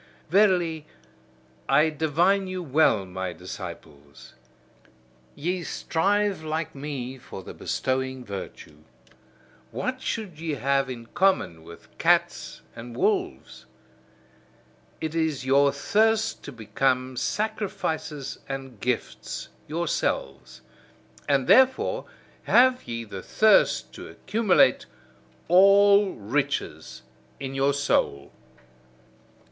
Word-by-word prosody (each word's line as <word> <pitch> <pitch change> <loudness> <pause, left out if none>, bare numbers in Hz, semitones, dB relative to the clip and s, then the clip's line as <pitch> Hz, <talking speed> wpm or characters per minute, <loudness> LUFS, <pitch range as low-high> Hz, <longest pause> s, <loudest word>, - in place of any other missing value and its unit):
Verily, 175 -6 +2 0.8
I 155 +1 +4
divine 170 +6 +1
you 185 -1 -4
well, 135 - +2
my 95 -1 -5
disciples: 85 -6 -10 1.0
ye 180 +4 -2
strive 200 +3 0
like 155 0 -3
me 135 -2 -6
for 95 -5 -10
the - - -9
bestowing 130 -1 -2
virtue. 95 -6 -8 0.9
What 255 - -4
should 200 -12 -4
ye 160 -2 -3
have 135 0 0
in 120 -2 -7
common 175 - +1
with 85 +1 -15
cats - - +1
and 120 +1 -9
wolves? - - -2 1.3
It 160 -1 -4
is 160 -5 -1
your 140 +1 +4
thirst 220 +9 +1
to - - -7
become 130 +3 -1
sacrifices 160 - -3
and 135 -4 -6
gifts 110 - -3 0.2
yourselves: 70 - -3 0.7
and 140 -2 +2
therefore 260 - +4 0.4
have 255 +1 +4
ye 115 0 -4
the 100 -4 -8
thirst 215 - +3
to - - -9
accumulate 210 -1 +2 0.6
all 200 +2 +6
riches 105 - -3 0.4
in 135 -1 -5
your 135 +1 +1
soul. 70 - 0
140 Hz, 100 wpm, -25 LUFS, 120-185 Hz, 1.3 s, all